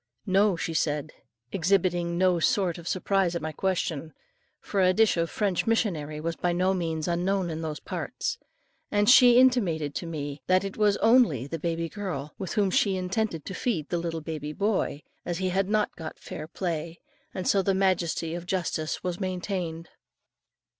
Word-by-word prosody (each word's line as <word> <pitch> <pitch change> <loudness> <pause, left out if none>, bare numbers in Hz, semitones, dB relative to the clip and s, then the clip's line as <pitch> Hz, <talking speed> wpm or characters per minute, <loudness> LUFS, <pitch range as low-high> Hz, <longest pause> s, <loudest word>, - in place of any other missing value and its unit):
"No," 195 +1 +3
she 165 0 -3
said; 150 -1 -1 0.4
exhibiting 175 -2 +1
no 180 -1 +3
sort 185 -2 +1
of 170 - -10
surprise 185 -1 +1
at 170 - -2
my 155 - -2
question, 160 -3 -2 0.5
for 200 - -1
a 185 0 +5
dish 225 -1 +4
of 165 -1 0
French 200 -1 -1
missionary 160 -10 0
was 165 +1 -2
by 175 +1 0
no 185 +2 +2
means 165 -4 -2
unknown 180 +1 0
in 160 0 -4
those 155 -3 -4
parts. - - -4 0.5
And 205 0 +2
she 245 0 +8
intimated 190 - +3
to 170 - -4
me, 145 -3 -5
that 185 +1 +4
it 195 -1 -5
was 205 -2 +3
only 225 - +4
the 165 +4 -5
baby 165 +1 -2
girl, 165 -7 -5
with 190 - -4
whom 200 -3 +2
she 195 -1 +2
intended 185 -2 -2
to 190 - -5
feed 185 - -2
the 175 - 0
little 165 -1 -3
baby 155 -1 -5
boy, 200 -6 -1 0.2
as 175 -1 -3
he 185 0 -1
had 190 +1 0
not 215 0 +1
got 160 -2 -7
fair 155 - -8
play; 170 -1 -4 0.3
and 185 - -4
so 200 - +4
the 195 0 +1
majesty 180 -4 +1
of 175 0 -6
justice 170 -4 -2
was 180 -1 -3
maintained. 180 -3 -3
175 Hz, 180 wpm, -27 LUFS, 160-195 Hz, 0.5 s, she